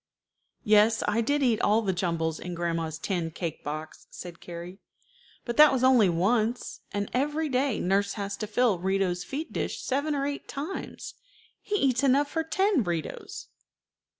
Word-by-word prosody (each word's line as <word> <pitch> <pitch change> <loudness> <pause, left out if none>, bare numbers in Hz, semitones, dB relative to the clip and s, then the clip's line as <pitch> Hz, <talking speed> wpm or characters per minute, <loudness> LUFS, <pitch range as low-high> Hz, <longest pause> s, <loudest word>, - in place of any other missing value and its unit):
"Yes, 215 +1 +4
I 210 +2 +2
did 285 +5 +1
eat 235 -4 +2
all 220 +2 +3
the 190 -2 0
jumbles 165 -3 -1
in 180 0 -6
grandma's 165 -2 -2
tin 170 -1 -2
cake 165 0 -5
box," 155 +2 -6
said 175 -2 -9
Carrie; 175 +3 -8 0.7
"but 235 -1 -4
that 300 0 +9
was 260 -2 0
only 250 -7 +6
once, 215 +7 0
and 205 0 -2
every 295 +4 0
day 260 -2 +1
nurse 200 +2 +1
has 200 -2 -4
to 215 - -4
fill 215 -3 +2
Rito's 190 -1 0
feed 305 +4 -5
dish - - -2
seven 285 +3 -1
or 275 -1 -1
eight 285 0 -4
times. 305 +8 -6 0.5
He 415 - -2
eats 260 - +2
enough 280 +2 +3
for 325 - 0
ten 380 - +2
Ritos." 170 -4 -5
215 Hz, 165 wpm, -27 LUFS, 175-270 Hz, 0.7 s, that